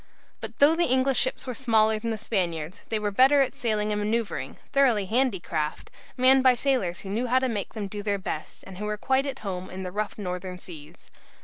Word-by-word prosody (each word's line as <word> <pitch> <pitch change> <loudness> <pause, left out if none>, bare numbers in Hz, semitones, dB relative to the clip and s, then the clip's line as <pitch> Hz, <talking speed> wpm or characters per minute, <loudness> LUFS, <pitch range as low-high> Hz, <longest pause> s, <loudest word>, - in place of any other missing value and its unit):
But - - -8
though 295 +3 +6
the 345 +1 +2
English 260 0 +3
ships 260 +2 -1
were 255 - -4
smaller 220 -3 +2
than 230 +1 -3
the 220 - -2
Spaniards, 180 -5 -3
they 225 - 0
were 210 -1 -2
better 265 +7 +5
at 270 - +1
sailing 215 -2 -1
and 210 0 -1
manoeuvring, 220 +1 -2 0.2
thoroughly 245 -8 +3
handy 235 0 +1
craft, 155 -3 -4 0.3
manned 260 +1 +6
by 255 -1 +5
sailors 240 -9 0
who 195 - -8
knew 230 +5 -1
how 250 +2 +3
to 260 0 +2
make 210 -5 -4
them 210 -2 -3
do 205 +1 -6
their 205 -1 -1
best, 165 -4 -6
and 190 -1 -10
who 210 - -3
were 210 0 -2
quite 265 +5 +1
at 265 -5 -6
home 185 -1 -4
in 190 +1 -6
the 180 - -5
rough 210 +2 -3
northern 180 -2 -5
seas. 165 -2 -13
215 Hz, 225 wpm, -26 LUFS, 190-255 Hz, 0.3 s, though